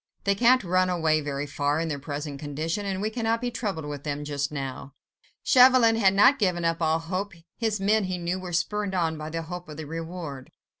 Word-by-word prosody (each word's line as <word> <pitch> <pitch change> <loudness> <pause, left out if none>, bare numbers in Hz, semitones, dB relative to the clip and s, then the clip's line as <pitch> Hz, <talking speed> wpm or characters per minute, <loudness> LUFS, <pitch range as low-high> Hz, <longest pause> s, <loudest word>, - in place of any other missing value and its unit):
They 200 - +3
can't 245 +4 +4
run 185 0 +2
away 160 -3 +1
very 145 -1 -3
far, 145 +1 -1
in 165 - -1
their 145 -3 -3
present 145 0 -5
condition, 155 +7 -3
and 190 0 -2
we 215 - -1
cannot 230 0 0
be 245 0 -3
troubled 200 -9 -3
with 145 -1 -6
them 145 -1 -3
just 145 -1 -2
now." 135 -1 -6 0.5
Chauvelin 250 -3 +6
had 195 -4 +3
not 255 +8 +6
given 180 -5 +1
up 165 0 0
all 160 0 +2
hope. 185 +5 -4 0.3
His 220 -3 0
men, 205 +1 +2
he 185 -1 -2
knew, 175 +1 -2
were 185 -1 -7
spurred 200 +3 -1
on 165 -3 0
by 155 0 -6
the 165 +1 -4
hope 175 +1 -7
of 150 - -8
the 160 - -6
reward. 165 -3 -7
170 Hz, 215 wpm, -26 LUFS, 150-200 Hz, 0.5 s, Chauvelin